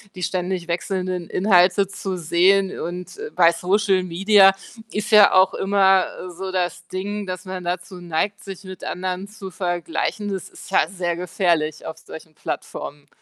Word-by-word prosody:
die 180 - -6
ständig 180 -1 -2
wechselnden 180 0 -3
Inhalte 185 0 +4
zu 195 -2 -5
sehen 185 +4 +2
und, 180 +1 -6
äh, 445 +1 -5
bei 170 -1 +6
Social 190 +2 +1
Media, 195 +2 +5 0.4
ist 210 +2 -3
ja 210 -1 +8
auch 185 +1 +5
immer, 195 -1 +3
äh, 180 - -7
so 190 +2 -6
das 180 -1 -2
Ding, 200 +2 -4
dass 185 0 -5
man 185 -1 -6
dazu 180 +1 -4
neigt, 175 +5 -2
sich 195 0 -9
mit 185 -1 -10
anderen 185 +1 -4
zu 200 -3 -9
vergleichen. 175 +3 -2
Das 190 - -5
ist - - -13
ja - - +3
sehr 175 -3 -2
gefährlich 170 -3 -1
auf 160 0 -7
solchen 160 0 -12
Plattformen. 145 -1 -6
185 Hz, 165 wpm, -22 LUFS, 175-195 Hz, 0.4 s, ja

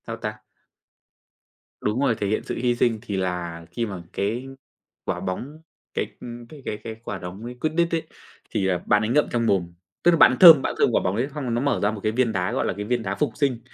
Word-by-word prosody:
Sao 115 0 -5
ta? 105 -1 -5 1.4
Đúng 105 +4 0
rồi, 130 -5 +3
thể 105 - -2
hiện 110 - 0
sự - - -4
hy 120 0 +1
sinh 120 -2 +1
thì 100 -2 -4
là 90 -3 -3
khi 115 +6 -2
mà 95 -5 -6
cái 115 +6 -2 0.6
quả - - -2
bóng 130 +12 -5 0.3
cái, - - -1
ưm, 120 0 -8
cái 150 +2 -12
cái 105 - -3
cái 110 -1 -6
quả 100 - -4
đóng 90 +4 -8
ấy 125 +1 -6
Quidditch 165 +2 +1
ấy, 160 - -1 0.5
thì, 100 -3 0
à, 90 -1 +2
bạn 105 - +4
ấy 110 - -1
ngậm 145 +5 +4
trong 120 -1 +1
mồm, 90 -5 +1 0.3
tức 175 - +6
là 170 - +3
bạn - - +8
ấy 130 - -2
thơm, 165 -6 +11
bạn - - -2
thơm - - +5
quả - - +2
bóng 90 - 0
ấy 120 +5 0
xong 130 -5 -2
nó 120 - 0
mở 140 +1 +1
ra 105 - +3
một 110 - -6
cái 110 - +1
viên 120 0 +1
đá, 90 -3 -1
gọi - - 0
là, - - 0
cái 105 - -5
viên 120 +1 0
đá 100 -1 -2
phục - - 0
sinh. 140 -5 +1
115 Hz, 255 wpm, -24 LUFS, 100-130 Hz, 1.4 s, thơm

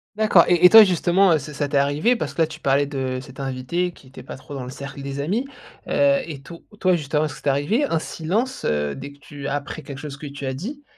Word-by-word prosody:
D'accord. 215 -5 +5
Et 175 0 +4
et 180 - +10
toi, 220 -1 +10
justement, 180 0 +3
heu, - - +4
c 150 +2 -9
ça 145 0 -2
t'es - - +1
arrivé, 145 - +2
parce - - -4
que - - -1
là, 160 - +4
tu 160 - -10
parlais 140 +1 +2
de 130 -2 -3
cet 130 +1 -13
invité 135 +7 -2
qui 140 - -19
était 130 - -12
pas - - -9
trop 145 - -12
dans 130 - -5
le 125 - -7
cercle 140 +1 -8
des 140 0 -5
amis, 205 - -1 0.4
heu, 280 0 +3
et 145 -5 -8
to 170 +4 -12 0.2
toi, 185 -1 +3
justement, 150 -1 -1
est-ce 145 - -5
que - - -11
ça - - -22
t'est 145 - +1
arrivé, 165 - +1
un 165 - 0
silence, 210 +14 -3
heu, 75 -1 0
dès 140 +1 -8
que 140 - -22
tu 145 -1 -8
a - - -2
après 145 +2 -5
quelque 135 -2 -8
chose 145 -2 -7
que 150 - -9
tu 140 -1 -7
as 130 - -2
dit? 250 - -7
145 Hz, 280 wpm, -22 LUFS, 140-180 Hz, 0.4 s, et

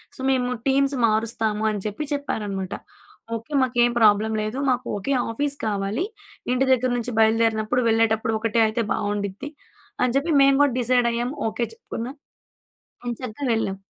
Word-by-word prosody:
So, - - -16
మేము 250 -1 +1 0.2
teams 275 +1 +2
మారుస్తాము 220 -1 0
అని 205 - -3
చెప్పి, 210 +9 -4
చెప్పారనమాట. 205 -9 -3 0.6
ఓకె. 230 +7 -8
మాకేం 240 -1 +3
ప్రాబ్లం 215 0 +4
లేదు. 215 +5 -3
మాకు 250 -1 0
ఒకే 275 +8 -1 0.2
ఆఫీస్ 285 +4 -1
కావాలి. 205 - -1 0.5
ఇంటి 260 +1 +2
దగ్గర 255 0 +2
నుంచి 240 +1 -3
బయలుదేరినప్పుడు, 225 +2 +2
వెళ్ళేటప్పుడు 225 0 +2
ఒకటే 230 0 +1
అయితే 225 +1 -1
బావుండిద్ది. 205 +5 -3 0.5
అని 250 -1 +1
చెప్పి 320 +4 0
మేము 275 0 +5
కూడా 275 -4 +2
డిసైడ్ 245 0 +2
అయ్యాము. 245 +5 -2
ఓకె. 235 +2 -2
చెప్పుకున్నాం 265 - -7 0.9
ఏం 240 - -1
చక్కగా 255 +3 -4
వెళ్ళాం. 195 -3 -1
230 Hz, 145 wpm, -23 LUFS, 215-255 Hz, 0.9 s, మేము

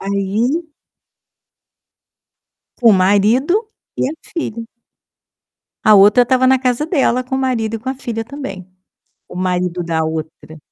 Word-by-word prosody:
Aí 220 - -2 2.1
Com 235 -2 +5
o - - +6
marido 220 - +2 0.3
e - - 0
a 295 - -4 0.2
filha. 230 -9 -4 1.2
A 215 -1 +7
outra 205 +5 +6
estava 260 +1 +2
na 265 0 +4
casa 255 +2 0
dela 270 -6 +1
com 255 - -4
o - - 0
marido 230 -4 -1
e - - -8
com 245 - -7
a 265 - -1
filha 235 -4 -5
também. 230 -9 -8 0.6
O - - -12
marido 180 -1 -1
da 165 -1 -1
outra 160 0 -6
230 Hz, 140 wpm, -17 LUFS, 195-265 Hz, 2.1 s, A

